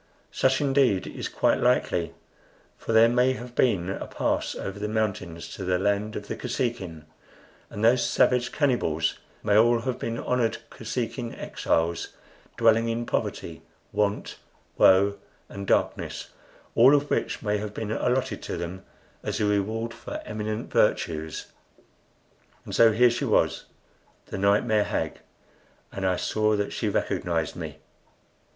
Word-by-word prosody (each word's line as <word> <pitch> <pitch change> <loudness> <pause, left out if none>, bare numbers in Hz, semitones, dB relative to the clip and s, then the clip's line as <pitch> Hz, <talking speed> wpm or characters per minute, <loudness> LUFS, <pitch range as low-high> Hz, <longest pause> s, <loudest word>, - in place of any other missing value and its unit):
Such, 135 +1 +2
indeed, 135 -8 +3
is - - -5
quite - - +2
likely, 85 -2 +1 0.6
for - - -5
there 115 +1 +7
may 125 +2 +3
have 120 -1 -8
been 105 -9 +2
a 100 - -4
pass - - -1
over 95 +1 -5
the 105 - -2
mountains 100 -6 -2
to 95 - -6
the 90 0 +1
land 100 +3 0
of 100 - -6
the - - -3
Kosekin; 115 - -3 0.6
and 105 +2 -2
those 120 +2 +5
savage 125 -1 +2
cannibals 100 - 0 0.2
may 100 - +2
all 115 +2 +5
have 125 0 -3
been 115 0 -3
honored 120 -3 0
Kosekin 120 0 -4
exiles, 85 +1 -1 0.5
dwelling 115 0 +4
in 115 +1 -2
poverty, - - -3 0.3
want, 105 0 -1 0.4
woe, 100 +2 +5 0.3
and 100 0 -7
darkness, - - 0 0.4
all 130 +5 +7
of 145 0 0
which - - -1
may 105 -1 0
have 105 0 -6
been 110 -1 -3
allotted 125 +3 0
to - - -4
them 90 +2 -6 0.4
as - - -3
a 105 - +2
reward 110 +3 0
for - - -7
eminent 110 +1 -4
virtues. 80 -1 0 1.1
And - - -7
so 115 -1 +6
here 120 +2 +5
she 120 - -2
was, - - +1 0.6
the 100 - -6
nightmare 105 +1 +3
hag, - - -2 0.7
and 95 -1 -2
I 90 - +2
saw 110 +3 +1
that 100 -1 -2
she - - -1
recognized 80 -3 -1
me. - - -6
110 Hz, 145 wpm, -26 LUFS, 100-120 Hz, 1.1 s, there